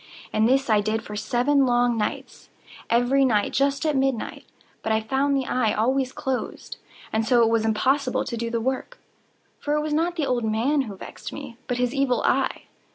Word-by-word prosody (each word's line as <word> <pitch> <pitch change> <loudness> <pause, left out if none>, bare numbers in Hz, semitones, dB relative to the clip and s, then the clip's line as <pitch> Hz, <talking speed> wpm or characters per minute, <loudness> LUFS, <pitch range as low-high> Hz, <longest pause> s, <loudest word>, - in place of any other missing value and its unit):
And 220 +2 +3
this 270 +1 +2
I 215 -3 +3
did 215 +1 -1
for 210 - -8
seven 250 +6 +2
long 245 0 +2
nights—every 245 +4 -2
night 215 -6 +2
just 275 +2 +1
at 305 -2 +1
midnight—but 265 -3 -3
I 220 - +3
found 270 +5 0
the 265 - -1
eye 235 -5 +1
always 255 +4 +1
closed; 260 -1 -4 0.4
and 220 +1 +1
so 240 +1 +4
it 225 - +3
was 225 -1 +1
impossible 255 +4 +1
to - - -4
do 230 0 -3
the 230 0 -1
work; 260 - -3 0.6
for 295 0 -1
it 300 - +1
was 305 0 -2
not 335 +3 +1
the 315 -4 0
old 245 -3 0
man 230 +7 +1
who 200 - -7
vexed - - -9
me, 275 -5 -8
but 245 - -1
his 250 0 0
Evil 275 -3 +1
Eye. - - +1
250 Hz, 190 wpm, -24 LUFS, 225-275 Hz, 0.6 s, so